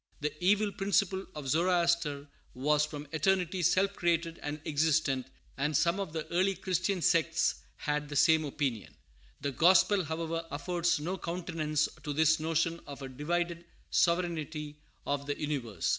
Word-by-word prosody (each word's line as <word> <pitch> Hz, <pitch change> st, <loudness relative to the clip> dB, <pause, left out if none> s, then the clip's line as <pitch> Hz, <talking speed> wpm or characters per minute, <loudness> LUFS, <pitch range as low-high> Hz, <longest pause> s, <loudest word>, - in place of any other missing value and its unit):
The 150 Hz, 0 st, -2 dB
evil 205 Hz, +2 st, +3 dB
principle 195 Hz, -1 st, 0 dB
of 150 Hz, -3 st, -6 dB
Zoroaster 170 Hz, -2 st, +1 dB, 0.3 s
was 150 Hz, +3 st, +2 dB
from 150 Hz, 0 st, -7 dB
eternity 180 Hz, +3 st, +1 dB
self 190 Hz, +3 st, +3 dB
created 170 Hz, -2 st, 0 dB
and 145 Hz, +1 st, -4 dB
existent, 150 Hz, -4 st, +1 dB, 0.3 s
and 150 Hz, +1 st, +1 dB
some 170 Hz, +4 st, +2 dB
of 195 Hz, -5 st, -3 dB
the 160 Hz, -1 st, -4 dB
early 190 Hz, +3 st, +2 dB
Christian 185 Hz, 0 st, -1 dB
sects 160 Hz, -1 st, +2 dB, 0.2 s
held 150 Hz, 0 st, -2 dB
the 145 Hz, -, -5 dB
same 160 Hz, +2 st, +5 dB
opinion. 135 Hz, -6 st, -3 dB, 0.5 s
The 140 Hz, -, -1 dB
gospel, 185 Hz, -, +4 dB
however, 165 Hz, +1 st, -3 dB
affords 175 Hz, +3 st, 0 dB
no 180 Hz, +5 st, -3 dB
countenance 165 Hz, -3 st, -1 dB
to 150 Hz, -, -4 dB
this 160 Hz, +2 st, +3 dB
notion 165 Hz, +1 st, 0 dB
of 140 Hz, -1 st, -8 dB
a 135 Hz, -, -5 dB
divided 170 Hz, +5 st, -2 dB, 0.3 s
sovereignty 155 Hz, -4 st, 0 dB, 0.3 s
of 140 Hz, 0 st, -2 dB
the 145 Hz, -, -3 dB
universe. 120 Hz, -, -2 dB
160 Hz, 145 wpm, -31 LUFS, 150-175 Hz, 0.5 s, same